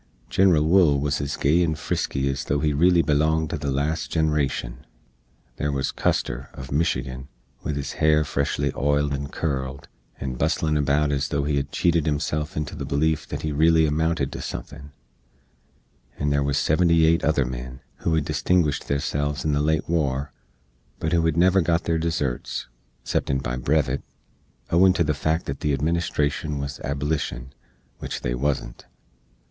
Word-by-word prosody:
Genral 90 -6 +4
Wool 80 -4 +4
wuz 70 0 -1
ez 70 0 -3
gay 80 +5 +3
and 80 -3 +1
frisky 70 -2 -1
ez 70 0 -2
though 70 - 0
he 75 0 +1
reely 85 +3 +4
belonged 80 +2 +1
to 80 - -1
the 70 -1 -2
last 75 +4 -1
ginerashn. 75 -6 0 0.8
There 75 - -1
wuz 70 -1 -1
Custar, - - -1
uv 65 0 -8
Michigan, 65 -4 -1 0.3
with 75 - -3
his 70 -1 -3
hair 75 0 +4
freshly 70 0 -1
oiled 70 +1 +1
and 70 +1 -4
curled, 70 -3 -3 0.3
and 65 -2 -4
busslin 80 -1 +1
about 75 0 +2
ez 70 0 0
though 70 0 -1
he 70 0 0
hed 70 +1 -2
cheated 85 0 +1
hisself 75 +1 -1
into 75 -1 -3
the - - -5
beleef 75 +3 0
that - - -5
he 80 - -1
reely 80 +2 +4
amounted 80 -1 0
to - - -6
suthin; 70 +2 -7 1.3
and 70 0 0
there 70 - +2
wuz 70 0 0
seventy 85 +1 +3
eight 85 +1 +3
other 75 -4 +2
men, 65 +1 -6 0.2
who 80 - 0
hed 80 -3 0
distinguished 85 -6 +1
theirselves 70 +1 -1
in 75 - +2
the 70 0 +1
late 80 +2 +1
war, 70 -4 0 0.7
but 80 +5 -2
who 85 -1 +3
hed 80 -1 +1
never 95 +2 +5
got 85 0 +1
their 80 -1 0
deserts, 80 -6 -2 0.4
ceptin 70 - 0
by 60 -2 -3
brevet, 70 +1 0 0.7
owin 90 +2 +5
to 85 - +2
the 75 -1 +1
fact 80 +3 -1
that 70 0 -4
the 75 - 0
Administrashn 75 -1 -1
wuz 70 0 -5
Ablishn, 70 -2 -2 0.5
which - - -5
they - - -1
wuzn't. 65 -1 -2
75 Hz, 170 wpm, -24 LUFS, 70-80 Hz, 1.3 s, never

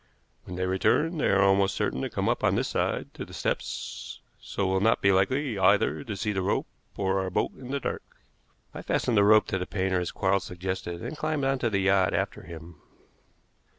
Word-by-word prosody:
When 90 - -7
they 90 +1 -1
return 150 - +1
they - - +2
are 100 0 +4
almost 95 0 +3
certain 65 - -1
to - - -2
come - - -2
up - - 0
on - - +3
this - - 0
side - - -2
to - - -6
the - - -10
steps, - - -4 0.2
so 100 - -3
will 95 0 +1
not 110 +3 +3
be 100 - +4
likely 110 +5 +1
either 100 +7 +3
to 110 -7 -5
see 105 +2 -1
the 95 - -1
rope 95 - 0 0.3
or 95 -1 +1
our 95 - -2
boat 90 - 0
in 130 -1 -10
the 140 +1 -1
dark." - - -3 0.7
I - - -7
fastened 120 - 0
the 100 - +5
rope 105 +1 +6
to 95 - -1
the 90 - -4
painter 95 -2 0
as 90 - -2
Quarles 100 0 +1
suggested, 90 -1 -5
and 125 +6 -5
climbed 155 -1 -2
on 135 0 +1
to 120 - +1
the 100 -3 0
yacht 95 -1 +3
after 95 +2 -2
him. 85 -3 -11
95 Hz, 220 wpm, -27 LUFS, 95-110 Hz, 0.7 s, rope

